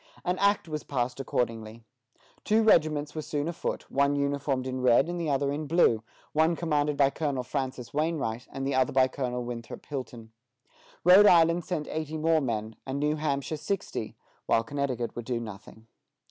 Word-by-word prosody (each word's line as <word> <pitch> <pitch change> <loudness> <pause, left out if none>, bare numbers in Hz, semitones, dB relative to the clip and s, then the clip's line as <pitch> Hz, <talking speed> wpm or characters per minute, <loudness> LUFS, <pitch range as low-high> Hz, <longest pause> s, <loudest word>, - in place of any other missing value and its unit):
An 180 +1 0
Act 200 -2 +2
was 155 -1 -4
passed 125 -2 -2
accordingly. 115 -3 -3 0.6
Two 220 +1 +3
regiments 155 -7 +3
were 155 - -3
soon 145 0 -3
afoot, 170 - -3
one 140 +1 +2
uniformed 140 -2 -1
in 130 0 -3
red, 125 +3 +4
and 175 0 -3
the 160 - -1
other 140 0 +1
in 150 +1 -3
blue; 145 -9 +3 0.3
one 160 +2 +3
commanded 150 -3 0
by 140 -1 +4
Colonel 140 -3 -2
Francis 130 -1 -4
Wainwright, 145 -7 -1
and 135 -1 -4
the 140 - 0
other 130 -1 +2
by 130 -1 +5
Colonel 125 -2 -3
Winthrop 120 -1 -7
Hilton. 125 -5 -7 0.7
Rhode 190 +4 +8
Island 170 -1 +5
sent 155 -5 -3
eighty 155 0 -4
more 160 0 +2
men, 110 -4 -3
and 135 +1 -4
New 150 +1 +1
Hampshire 150 0 -2
sixty, 155 - -4 0.3
while 115 - +3
Connecticut 130 -2 -3
would 120 - -6
do 120 -1 -1
nothing. 110 0 -10
140 Hz, 175 wpm, -28 LUFS, 125-155 Hz, 0.7 s, Rhode